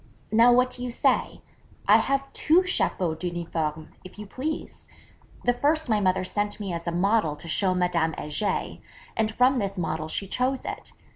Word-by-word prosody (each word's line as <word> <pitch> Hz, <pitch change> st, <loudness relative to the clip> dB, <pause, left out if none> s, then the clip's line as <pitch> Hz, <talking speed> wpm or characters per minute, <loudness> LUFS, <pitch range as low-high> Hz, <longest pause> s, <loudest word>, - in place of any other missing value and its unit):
Now 230 Hz, +2 st, +6 dB
what 250 Hz, +1 st, +4 dB
do 250 Hz, -, -6 dB
you 250 Hz, -, -3 dB
say: 235 Hz, -, 0 dB, 0.4 s
I -, -, +8 dB
have 275 Hz, 0 st, -1 dB
two 335 Hz, +4 st, +4 dB
chapeaux 185 Hz, -, 0 dB
d'uniforme, 160 Hz, -2 st, -4 dB
if 185 Hz, -, -13 dB
you 210 Hz, -, -7 dB
please! 285 Hz, +9 st, -5 dB, 0.6 s
The 245 Hz, -, +4 dB
first 300 Hz, +3 st, +1 dB
my 215 Hz, -2 st, +3 dB
mother 190 Hz, -1 st, +1 dB
sent 205 Hz, +3 st, -2 dB
me 195 Hz, -4 st, -4 dB
as 170 Hz, 0 st, -5 dB
a -, -, +1 dB
model 180 Hz, -2 st, +1 dB
to 165 Hz, -, -9 dB
show 185 Hz, +3 st, +1 dB
Madame 175 Hz, -3 st, +1 dB
Heger, 150 Hz, +8 st, -2 dB, 0.4 s
and 220 Hz, -1 st, +1 dB
from 250 Hz, +3 st, +3 dB
this 200 Hz, -2 st, -3 dB
model 160 Hz, -2 st, -2 dB
she 195 Hz, -, -2 dB
chose 255 Hz, +6 st, -1 dB
it. -, -, -6 dB
200 Hz, 175 wpm, -26 LUFS, 170-250 Hz, 0.6 s, I